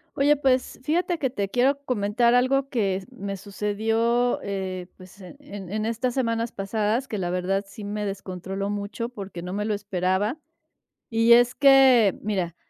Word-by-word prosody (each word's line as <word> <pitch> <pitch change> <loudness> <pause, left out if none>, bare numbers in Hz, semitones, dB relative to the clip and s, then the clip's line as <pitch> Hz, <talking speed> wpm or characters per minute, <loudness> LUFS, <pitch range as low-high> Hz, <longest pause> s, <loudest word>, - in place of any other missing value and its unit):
Oye, 290 +2 +4
pues, 260 -2 0
fíjate 340 +4 0
que 265 - -1
te 200 -6 -3
quiero 260 +6 +2
comentar 235 0 +1
algo 265 +2 +2
que 195 -7 -1
me 200 -6 -6
sucedió, 225 +5 0
eh, 190 -2 -4
pues, 185 +2 -15
en 185 +9 -12 0.3
en 215 +1 -2
estas 235 +2 -1
semanas 230 -3 -1
pasadas, 215 +5 -1
que 215 - -3
la 175 -2 -2
verdad 185 +2 -1
sí 205 +1 -10
me 210 +1 -3
descontroló 195 0 -5
mucho 205 +3 -4
porque 195 -6 -8
no 180 +1 -6
me 205 +2 -2
lo 215 0 0
esperaba. 200 - -1 0.7
Y 230 0 +5
es 245 +1 +5
que, 265 -7 +6
mira, 185 -5 -2
210 Hz, 160 wpm, -25 LUFS, 195-245 Hz, 0.7 s, que